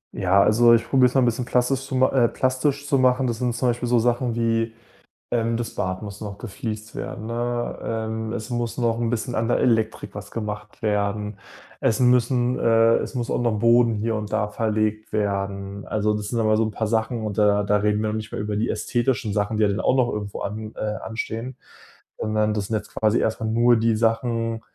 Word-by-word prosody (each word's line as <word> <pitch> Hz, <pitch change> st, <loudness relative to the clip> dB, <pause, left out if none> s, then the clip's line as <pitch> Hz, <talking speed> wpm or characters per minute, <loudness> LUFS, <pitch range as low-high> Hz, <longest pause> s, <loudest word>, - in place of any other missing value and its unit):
Ja, 95 Hz, +1 st, +3 dB
also, 115 Hz, +3 st, +6 dB
ich 115 Hz, -, -1 dB
probiere 130 Hz, -2 st, +5 dB
es 125 Hz, -, -5 dB
mal 135 Hz, -, +5 dB
'n -, -, +4 dB
bisschen 120 Hz, +1 st, 0 dB
plastisch 130 Hz, +2 st, 0 dB
zu 130 Hz, -, -4 dB
ma 130 Hz, 0 st, +4 dB
äh, 125 Hz, -3 st, +4 dB
plastisch 135 Hz, +3 st, 0 dB
zu 140 Hz, -3 st, +2 dB
machen. 130 Hz, +1 st, +3 dB
Das 120 Hz, -1 st, -2 dB
sind 120 Hz, -2 st, -1 dB
zum 125 Hz, +1 st, +1 dB
Beispiel 120 Hz, 0 st, -1 dB
so 120 Hz, -, +4 dB
Sachen 120 Hz, 0 st, +1 dB
wie, 115 Hz, -1 st, 0 dB, 0.6 s
ähm, 115 Hz, -1 st, +1 dB
das 120 Hz, 0 st, -4 dB
Bad 95 Hz, +1 st, -3 dB
muss 100 Hz, -1 st, -8 dB
noch 100 Hz, -2 st, -7 dB
gefliest 110 Hz, 0 st, -6 dB
werden, 110 Hz, -, -6 dB
ne? 120 Hz, +1 st, -2 dB
Ähm, 110 Hz, 0 st, -3 dB
es 110 Hz, +3 st, -5 dB
muss 120 Hz, -1 st, -2 dB
noch 115 Hz, -1 st, 0 dB
'n 115 Hz, -1 st, 0 dB
bisschen 120 Hz, +1 st, -2 dB
an 115 Hz, +1 st, 0 dB
der -, -, +2 dB
Elektrik 110 Hz, -2 st, 0 dB
was 105 Hz, -1 st, -7 dB
gemacht 105 Hz, -1 st, -6 dB
werden. 105 Hz, -1 st, -1 dB, 0.4 s
Es 110 Hz, +3 st, +1 dB
müssen 125 Hz, 0 st, +3 dB
äh, 115 Hz, 0 st, +4 dB
es -, -, -4 dB
muss 120 Hz, -1 st, -2 dB
auch -, -, 0 dB
noch 115 Hz, -3 st, +1 dB
Boden 115 Hz, 0 st, +4 dB
hier 110 Hz, +1 st, -1 dB
und 105 Hz, 0 st, -5 dB
da 105 Hz, -1 st, 0 dB
verlegt 110 Hz, 0 st, -1 dB
werden. 100 Hz, -1 st, -2 dB
Also, 105 Hz, 0 st, 0 dB
das 105 Hz, -1 st, -3 dB
sind 115 Hz, 0 st, -1 dB
aber 110 Hz, 0 st, +3 dB
so 115 Hz, -, +3 dB
'n 110 Hz, -, -3 dB
paar 110 Hz, 0 st, -2 dB
Sachen 110 Hz, +1 st, -1 dB
und 105 Hz, -1 st, -4 dB
da 105 Hz, -1 st, +3 dB
da 105 Hz, +1 st, +2 dB
reden 105 Hz, +1 st, +1 dB
wir 110 Hz, -, 0 dB
nicht 110 Hz, 0 st, -5 dB
mehr -, -, -3 dB
über 105 Hz, 0 st, -2 dB
die 115 Hz, +4 st, 0 dB
ästhetischen 120 Hz, -3 st, -1 dB
Sachen, 105 Hz, +1 st, -1 dB
die 110 Hz, -, +2 dB
ja 100 Hz, -, +3 dB
dann 100 Hz, -, -1 dB
auch 130 Hz, -, +2 dB
noch 125 Hz, -2 st, +2 dB
irgendwo 105 Hz, -1 st, -5 dB
an 110 Hz, +1 st, -5 dB
äh, 105 Hz, 0 st, -3 dB
anstehen, 115 Hz, +2 st, -4 dB, 0.6 s
sondern 110 Hz, 0 st, 0 dB
das 105 Hz, -2 st, -2 dB
sind 110 Hz, -, -1 dB
jetzt 105 Hz, -1 st, -5 dB
quasi 110 Hz, +1 st, +2 dB
erstmal 110 Hz, 0 st, -1 dB
nur 120 Hz, +1 st, +4 dB
die 115 Hz, 0 st, +2 dB
Sachen 115 Hz, 0 st, 0 dB
115 Hz, 225 wpm, -23 LUFS, 105-120 Hz, 0.6 s, also